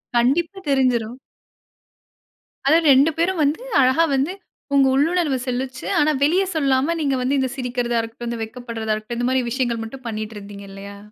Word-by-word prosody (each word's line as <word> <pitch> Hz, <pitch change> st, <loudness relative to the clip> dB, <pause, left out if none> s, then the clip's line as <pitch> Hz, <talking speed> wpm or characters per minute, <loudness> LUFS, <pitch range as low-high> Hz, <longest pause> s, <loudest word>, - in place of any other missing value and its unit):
கண்டிப்பா 305 Hz, +11 st, +2 dB
தெரிஞ்சிரும். 250 Hz, -4 st, +1 dB, 1.5 s
அதாவது 320 Hz, +3 st, +4 dB
2 275 Hz, +5 st, +5 dB
பேரும் 345 Hz, +1 st, +1 dB
வந்து 295 Hz, +10 st, 0 dB, 0.2 s
அழகா 260 Hz, +5 st, +4 dB
வந்து 275 Hz, +6 st, 0 dB, 0.4 s
உங்க 275 Hz, -1 st, +5 dB
உள்ளுணர்வு 300 Hz, -1 st, +1 dB
சொல்லிச்சு. 255 Hz, +1 st, -4 dB
ஆனா 300 Hz, +1 st, +3 dB
வெளிய 355 Hz, +6 st, +3 dB
சொல்லாம 280 Hz, +1 st, +1 dB
நீங்க 280 Hz, -3 st, +1 dB
வந்து 275 Hz, +3 st, +1 dB
இந்த 260 Hz, -1 st, 0 dB
சிரிக்கிறதா 245 Hz, -2 st, -1 dB
இருக்கட்டும், 230 Hz, +1 st, -6 dB
இந்த 235 Hz, -1 st, -4 dB
வெட்கப்படுறதா 225 Hz, -1 st, -4 dB
இருக்கட்டும். 215 Hz, +2 st, -5 dB
இந்த 245 Hz, -, +1 dB
மாதிரி 260 Hz, 0 st, +2 dB
விஷயங்கள் 240 Hz, -2 st, -1 dB
மட்டும் 255 Hz, +3 st, -10 dB
பண்ணிட்டு 215 Hz, 0 st, -5 dB
இருந்தீங்க 200 Hz, 0 st, -10 dB
இல்லையா? 200 Hz, +1 st, -9 dB
260 Hz, 155 wpm, -21 LUFS, 235-285 Hz, 1.5 s, 2